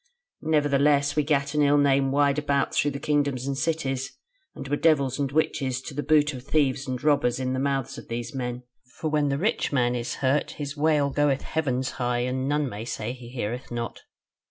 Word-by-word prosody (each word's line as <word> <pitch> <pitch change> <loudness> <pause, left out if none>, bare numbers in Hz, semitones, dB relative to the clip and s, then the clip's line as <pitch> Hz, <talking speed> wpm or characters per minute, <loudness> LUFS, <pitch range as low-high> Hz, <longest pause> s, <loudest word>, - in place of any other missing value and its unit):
Nevertheless 145 -2 +2
we 150 - +3
gat 140 -1 0
an 150 - +2
ill 145 0 +4
name 135 -1 +3
wide 140 0 +3
about 140 -1 0
through 145 - +2
the 140 -1 -5
kingdoms 145 -3 0
and 140 0 -1
cities; 135 -4 -2 0.4
and - - -7
were 145 - +1
devils 140 -4 +2
and 140 -2 -1
witches 135 -4 0
to 145 - -7
the 145 - -2
boot 150 0 +3
of 130 - -7
thieves 140 -2 +1
and 130 -1 -4
robbers 140 -5 +2
in 130 0 -1
the 130 - -1
mouths 135 -2 -1
of - - -13
these 120 +2 -4
men; 125 -2 -4 0.3
for 155 - -3
when 150 -2 +2
the 140 - 0
rich 205 +9 0
man 125 -3 +2
is 120 -1 -3
hurt 140 +2 0
his 145 -1 -4
wail 150 -2 +2
goeth 145 -1 +1
heavens 130 -5 -1
high, 120 -1 -1
and 130 +2 -1
none 150 0 +1
may 110 -3 -6
say 115 0 -4
he 125 -2 -11
heareth 120 0 -4
not. 120 -1 -4
140 Hz, 205 wpm, -26 LUFS, 130-145 Hz, 0.4 s, ill